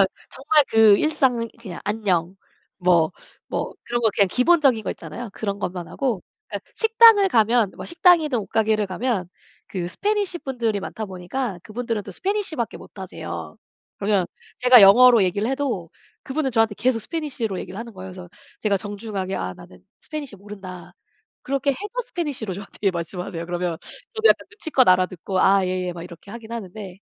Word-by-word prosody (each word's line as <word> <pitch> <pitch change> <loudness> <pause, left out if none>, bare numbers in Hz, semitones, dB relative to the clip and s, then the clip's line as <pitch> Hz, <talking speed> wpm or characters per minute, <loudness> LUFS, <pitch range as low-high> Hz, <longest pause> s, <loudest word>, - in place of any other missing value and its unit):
그냥 195 - +6 0.2
정말 300 +2 +3
그 220 -2 +7
일상 255 -7 +1
그냥 190 -7 -8
'안녕.' 195 -4 0 0.4
뭐 175 -3 +3 0.4
뭐 - - -3
그런 240 0 -1
거 220 - +4
그냥 200 - +4
기본적인 260 - +3
거 - - -3
있잖아요. 235 -2 -7
그런 200 -1 -3
것만 180 -3 -4
하고. 240 -6 -2 0.3
예 - - 0 0.2
식당을 450 -3 +6
가면 225 - +3
식당이든 340 -6 +4
옷 210 - -6
가게를 220 -1 +1
가면 195 -1 -2 0.4
그 190 - -6
Spanish 400 - -1
분들이 235 -6 -1
많다 220 - -5
보니까 190 +3 -4
그분들은 230 -1 -3
또 - - -9
Spanish 395 -4 -2
밖에 235 -5 -3
못하세요. 160 - -8 0.4
그러면 200 -3 +1 0.3
제가 250 -1 +8
영어로 235 +3 +8
얘기를 200 +4 0
해도 265 -11 -2 0.4
그분은 270 0 -1
저한테 225 -3 +2
계속 245 +4 +1
Spanish로 240 - -3
얘기를 190 - -8
하는 230 0 -7
거예요. 190 -1 -9
그래서 180 -1 -10 0.3
제가 205 -2 +2
정중하게 200 -1 -4
"아 90 0 -4
나는 90 0 -15 0.2
Spanish 290 -8 -6
모른다." 195 -3 -10 0.5
그렇게 275 +1 0
해도 395 +10 -4
Spanish로 290 - -4
저한테 200 +1 -2
말씀하세요. 170 0 -5
그러면 175 -1 -2 0.4
저도 445 0 +4
약간 - - +3
눈치껏 320 - +1
알아듣고 185 0 +2
"아 195 0 +5
예예." 180 -1 -2
막 170 -1 -8
이렇게 175 +2 -12
하긴 230 -1 -9
하는데 195 -3 -7
215 Hz, 420 characters per minute, -23 LUFS, 185-260 Hz, 0.5 s, 제가